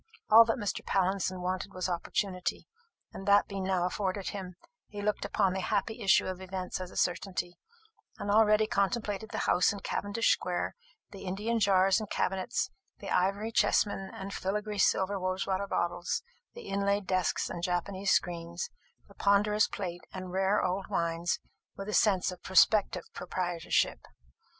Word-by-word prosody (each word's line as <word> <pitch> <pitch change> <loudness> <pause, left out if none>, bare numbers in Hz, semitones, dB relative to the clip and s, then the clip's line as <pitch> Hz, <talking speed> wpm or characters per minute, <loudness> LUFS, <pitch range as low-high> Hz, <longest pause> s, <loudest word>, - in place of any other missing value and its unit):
All 225 +1 +10
that 225 +3 0
Mr. 205 -5 -3
Pallinson 190 -1 0
wanted 185 +2 -3
was 185 0 -1
opportunity; 180 +1 -2 0.5
and 195 - -8
that 200 0 +5
being 195 -1 -4
now 185 -2 +1
afforded 190 +1 -2
him, 185 -3 -6 0.3
he 205 - -8
looked 210 +1 -1
upon 185 - +1
the 190 - -2
happy 220 +5 -1
issue 195 -2 +4
of 185 0 -4
events 185 0 -4
as 185 - -5
a - - -11
certainty, 180 -1 -1 0.6
and 205 - -2
already 215 0 +5
contemplated 210 +1 -1
the - - -5
house 180 - +4
in 200 -1 -6
Cavendish 205 +3 0
square, 180 -1 -2 0.4
the 195 -1 -9
Indian 210 +5 -1
jars 195 0 +4
and 215 -2 -6
cabinets, 190 0 -1 0.3
the 200 - -7
ivory 200 +4 +1
chessmen 200 -3 +2
and 195 +1 -7
filigree 210 +2 -2
silver 195 +1 +2
rosewater 190 +1 -1
bottles, 175 - -1 0.3
the 475 - -9
inlaid 200 0 0
desks 185 0 0
and 170 - -5
Japanese 185 +2 -1
screens, 170 - 0 0.4
the - - -17
ponderous 210 +1 +3
plate 175 -3 -5
and 185 -1 -7
rare 190 +2 +2
old 185 +2 -1
wines, 170 +1 0 0.4
with 195 - -6
a 210 - -3
sense 195 -4 +3
of 180 - -10
prospective 195 +2 +4
proprietorship. 175 -2 -1
195 Hz, 155 wpm, -30 LUFS, 185-205 Hz, 0.6 s, All